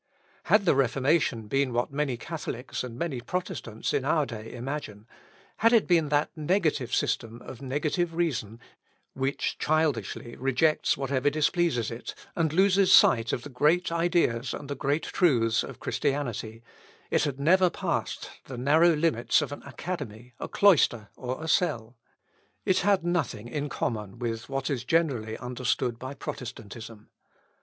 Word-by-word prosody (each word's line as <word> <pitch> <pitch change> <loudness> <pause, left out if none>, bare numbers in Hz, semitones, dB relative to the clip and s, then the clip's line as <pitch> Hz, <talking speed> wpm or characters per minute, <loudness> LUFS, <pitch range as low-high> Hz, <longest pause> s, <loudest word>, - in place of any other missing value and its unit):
Had 210 -2 +4
the - - +5
Reformation 135 -2 +1
been 135 +1 +1
what 120 +3 0
many 140 -4 -1
Catholics 130 -3 -5
and 120 -2 -7
many 140 -5 -3
Protestants 135 - -4
in - - +1
our 150 +1 +2
day 115 -3 -8
imagine, 120 -4 -6 0.5
had 230 +2 +4
it 230 - +5
been 165 -4 +3
that 145 +1 +1
negative 155 - 0
system 115 -2 -1
of 130 - -10
negative 155 +5 -1
reason, 120 -10 -1 0.5
which 135 +1 -2
childishly 145 -7 0
rejects 135 +4 +2
whatever 135 +1 +1
displeases 155 - +1
it, 115 +1 -7 0.2
and 160 -3 +1
loses 190 +2 +4
sight 115 -11 +6
of 120 - -2
the 145 - -8
great 155 +7 +2
ideas 165 -8 +1
and 140 0 -6
great 145 +3 0
truths 120 - +2
of - - -8
Christianity, 120 -5 -2 0.5
it - - +3
had 140 -2 -3
never 180 +5 +4
passed - - -3
the 130 - -7
narrow 155 +6 +4
limits 150 -7 +2
of - - -3
an 145 - -7
academy, 130 -7 -6
a - - -4
cloister, 135 - +3
or 130 +4 -5
a - - -4
cell. 130 - 0 0.7
It 185 - +3
had 200 -4 +2
nothing 160 -11 -1
in 145 +4 -3
common 105 -5 -3
with 115 -1 -4
what 135 +1 -2
is 125 -4 -2
generally 125 -8 0
understood 125 -1 -2
by 130 +3 -6
Protestantism. 115 -4 -8
135 Hz, 150 wpm, -27 LUFS, 120-160 Hz, 0.7 s, sight